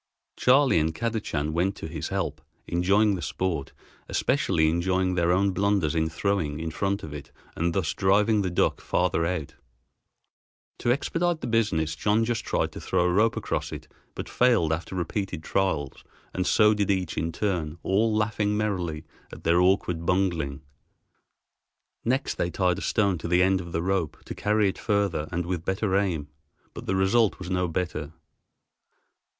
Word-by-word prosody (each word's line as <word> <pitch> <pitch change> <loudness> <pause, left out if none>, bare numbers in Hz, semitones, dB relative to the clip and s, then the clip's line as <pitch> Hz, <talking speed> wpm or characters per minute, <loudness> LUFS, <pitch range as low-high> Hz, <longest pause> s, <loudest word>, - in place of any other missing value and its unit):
Charley 130 - +4
and 80 +1 0
Kadachan 105 -10 -2
went 90 +4 +1
to - - -7
his 80 -1 -5
help, - - -3 0.2
enjoying 100 +5 +3
the 90 - -3
sport, 80 -1 -2 0.4
especially 130 - +2
enjoying 90 +3 +1
their 85 -1 +2
own 95 +2 +3
blunders 100 -5 +1
in 80 -1 +1
throwing 80 -3 -1
in 80 0 -3
front 100 +5 -1
of 75 - -7
it 70 -2 -9 0.2
and 85 0 -1
thus 80 +1 0
driving 100 +2 +3
the 95 - -1
duck 85 - +1
farther 80 0 +1
out. 85 -5 -3 1.3
To 120 - +1
expedite 165 +5 0
the - - -4
business 95 -9 +1
John 105 +7 +2
then 120 +1 +1
tried 115 - -1
to - - -9
throw - - +1
a 90 0 +2
rope 110 +4 +3
across - - -2
it, - - -8 0.3
but - - -5
failed 115 -11 +3
after 85 +3 -4
repeated 90 -1 -3
trials, 80 -9 -1 0.3
and 90 -1 -1
so 105 0 +5
did 105 -2 -1
each 95 -4 0
in 85 - -1
turn, 85 -4 -2
all 110 +4 +2
laughing 105 -1 0
merrily 90 -7 -2 0.3
at - - -11
their 85 +2 +4
awkward 90 -3 +2
bungling. 85 -6 0 1.4
Next 130 +4 -1
they 85 - +1
tied 90 -1 +1
a - - -8
stone 100 -5 +1
to 85 - -5
the 90 +1 +4
end 95 0 +2
of 85 -1 -9
the 80 +1 -1
rope 95 -4 -1
to - - -6
carry 105 0 +1
it 95 - -3
further 100 -7 0
and 85 0 -2
with 90 -2 -3
better 95 +1 0
aim, 90 -7 0 0.5
but - - -9
the 95 - +1
result 95 +3 +3
was 90 0 -7
no 90 -1 +1
better. 80 -3 -3
95 Hz, 170 wpm, -26 LUFS, 80-105 Hz, 1.4 s, so